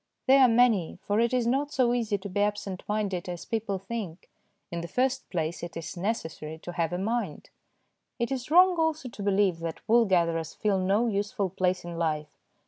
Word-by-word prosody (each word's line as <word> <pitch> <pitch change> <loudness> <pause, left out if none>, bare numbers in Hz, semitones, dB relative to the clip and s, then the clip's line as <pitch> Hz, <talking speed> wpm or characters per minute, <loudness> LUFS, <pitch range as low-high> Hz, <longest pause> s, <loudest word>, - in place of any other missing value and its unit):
They 270 +1 +6
are 260 - +8
many, 230 -8 +3
for 205 +1 0
it 235 0 +2
is 250 -2 +1
not 275 +4 +1
so 250 -4 +2
easy 225 -4 0
to 200 +1 -7
be 200 +1 -1
absent 205 -2 -1
minded 200 -4 -1
as 175 -1 -6
people 215 -3 -2
think; 195 -3 -6 0.4
in 170 0 -3
the 170 - -5
first 260 +6 0
place, 165 -1 -2
it 170 -1 -6
is 165 +1 -6
necessary 160 -5 -3
to 175 - -5
have 170 -1 -1
a 175 - -1
mind. 205 -4 -3 0.7
It 235 +1 -2
is 260 0 -3
wrong 360 +2 +6
also 315 -5 0
to 225 - -10
believe 195 -3 +2
that 165 -1 -6
wool 235 +1 +5
gatherers 170 -4 +1
fill 205 -3 +1
no 195 +5 +2
useful 205 -2 -1
place 185 0 0
in 170 -1 -6
life. 155 -2 -1
205 Hz, 200 wpm, -28 LUFS, 175-235 Hz, 0.7 s, are